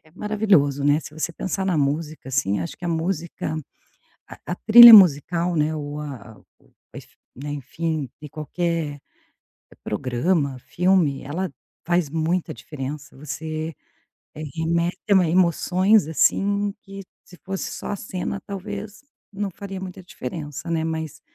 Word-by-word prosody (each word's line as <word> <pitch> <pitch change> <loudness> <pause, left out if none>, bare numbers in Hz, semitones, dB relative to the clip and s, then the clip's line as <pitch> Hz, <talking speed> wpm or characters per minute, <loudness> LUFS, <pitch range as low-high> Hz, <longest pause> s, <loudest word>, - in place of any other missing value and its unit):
maravilhoso 195 -10 +2
né, 145 +2 +4
se 155 - -11
você 160 +2 -3
pensar 190 +1 -3
na 185 -4 +1
música, 150 0 -2
assim, 125 -7 0
acho 170 - -6
que 175 - -8
a - - -1
música, 165 -1 -2 0.7
a - - -10
a 175 - -2
trilha 235 +1 +10
musical 175 -2 +6
né, 155 0 +1
ou 145 0 -5
a 125 -7 -9 1.0
não 145 +3 -7
é, - - -3
enfim, 145 0 -3
de 150 - -9
qualquer 155 0 -3 0.8
programa, 135 - -1
filme, 175 -6 +1
ela 170 +6 -3 0.4
faz 175 -3 +1
muita 165 +3 -1
diferença, 145 0 -7
você 155 +3 -5 0.8
remete 170 +2 0
emoções 185 +2 +3
assim 200 +5 +1
que 195 0 -9 0.2
se 180 - -16
fosse 190 0 -4
só - - -7
a 205 - -2
cena 195 0 -4
talvez 205 +2 -7 0.3
não 200 0 -3
faria 195 +1 -7
muita 185 0 -8
diferença, 150 0 -7
né, 160 -1 0
mas 160 -2 -4
165 Hz, 130 wpm, -23 LUFS, 145-190 Hz, 1.0 s, trilha